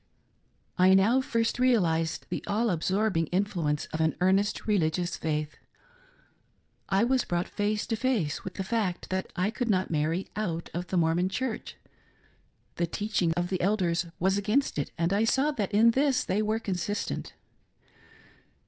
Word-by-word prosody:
I 185 +1 +6
now 225 +7 +4
first 230 -2 -1
realised 170 -11 +2
the - - -3
all 220 +2 +1
absorbing 185 0 0
influence 175 -6 -1
of 160 - -1
an 160 0 +1
earnest 190 +3 +1
religious 175 -4 0
faith. 150 -1 -3 1.3
I 195 +2 +3
was 255 +1 +2
brought 175 0 -1
face 210 0 -1
to 225 - -1
face 220 - -1
with 190 - -7
the 195 - -3
fact 190 -4 -2
that 190 0 -2
I 185 +4 0
could 245 0 -3
not 185 -3 +1
marry 160 +4 0
out 170 -6 -3
of 180 +1 -4
the 185 - -1
Mormon 170 +2 +2
Church. 230 +4 -4 1.0
The 170 - 0
teaching 205 -2 0
of 175 +1 -2
the 185 - -1
elders 180 -3 +1
was 190 +3 +2
against 210 - 0
it, 140 - -2
and 170 +3 +1
I 205 +2 +2
saw 270 +6 +2
that 215 -9 -3
in 220 +3 +5
this 270 +1 +2
they 205 - 0
were 215 +1 0
consistent. 205 -1 -3
190 Hz, 155 wpm, -28 LUFS, 170-220 Hz, 1.3 s, I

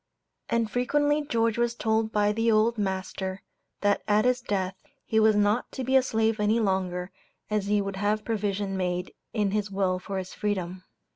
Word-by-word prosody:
And 230 -1 +1
frequently 290 +5 +2
George 230 -5 0
was 240 0 +1
told 220 -1 0
by 210 -1 +2
the 225 +2 +2
old 220 +1 +3
master 190 -1 -3 0.4
that 205 0 +2
at 210 +2 +3
his 250 0 +2
"death 195 -4 -1 0.3
he 220 - +2
was 220 -1 +5
not 210 +3 +2
to 265 - -4
be 260 +2 +1
a 265 - +7
slave 225 -3 0
any 210 +2 +2
longer, 185 -3 -1 0.4
as 210 -2 0
he 205 0 +2
would 195 -1 -4
have 210 +2 0
provision 205 -3 -1
made 180 -1 -2 0.2
in 210 -3 0
his 210 0 -1
will 190 -2 0
for 195 +1 -5
his 185 -1 -5
freedom." 185 -3 -3
210 Hz, 185 wpm, -27 LUFS, 195-225 Hz, 0.4 s, a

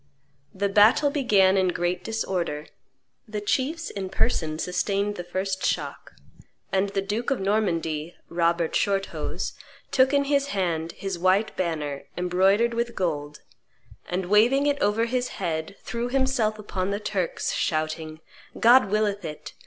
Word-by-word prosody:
The 200 +1 -1
battle 215 +8 +5
began 200 -9 +4
in 190 -1 +3
great 175 0 -1
disorder; 180 -9 -2 0.6
the 215 -1 -4
chiefs 275 +10 -1
in 190 -2 -4
person 160 -7 0
sustained 200 +4 -1
the 180 - -6
first 190 +2 -3
shock; - - -2 0.6
and 195 +1 +1
the 195 0 -1
duke 215 +6 -2
of 270 - 0
Normandy, 170 -6 -1
Robert 170 -1 +1
Shorthose, 195 -1 -1 0.4
took 260 0 +4
in 285 -1 +3
his 280 0 +1
hand 170 - -1
his 195 -3 -5
white 185 +4 +2
banner, 150 -6 -2
embroidered 190 +6 +3
with 235 0 -2
gold, 150 -5 -2 0.7
and 180 +1 -1
waving 230 +9 +4
it 285 -1 +1
over 210 +3 +2
his 250 +1 -1
head, 165 +1 -3
threw 240 0 -3
himself 260 -5 +1
upon 195 -3 -3
the 200 0 -1
Turks, 195 -4 -2
shouting, 155 0 -2 0.4
"God 240 -1 +6
willeth 205 -1 0
it! 155 -2 -7
195 Hz, 140 wpm, -25 LUFS, 175-225 Hz, 0.7 s, God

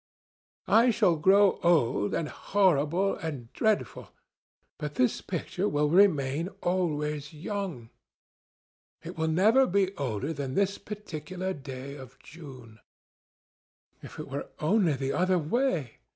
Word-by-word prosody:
I 235 +3 +5
shall 180 -6 +3
grow 195 +5 +4
old, 150 -11 +2
and 160 - -1
horrible, 185 0 +1
and 145 - -6
dreadful. 220 -2 -1 0.7
But 150 -1 -5
this 125 -1 +1
picture 185 +3 -3
will 150 0 +1
remain 160 -5 +3 0.2
always 150 -5 -1
young. 160 - -5 1.1
It - - -8
will 160 0 -1
never 215 +11 +4
be 195 +1 +1
older 135 +2 -2
than 135 -2 -5
this 200 0 +1
particular 185 -2 -6
day 135 -2 -8
of 130 -2 -12
June.... 130 -9 -13 1.2
If - - -11
it - - -7
were 140 +1 -5
only 175 0 +2
the 135 0 -2
other 185 0 +2
way! 165 - -1
160 Hz, 125 wpm, -28 LUFS, 140-190 Hz, 1.2 s, I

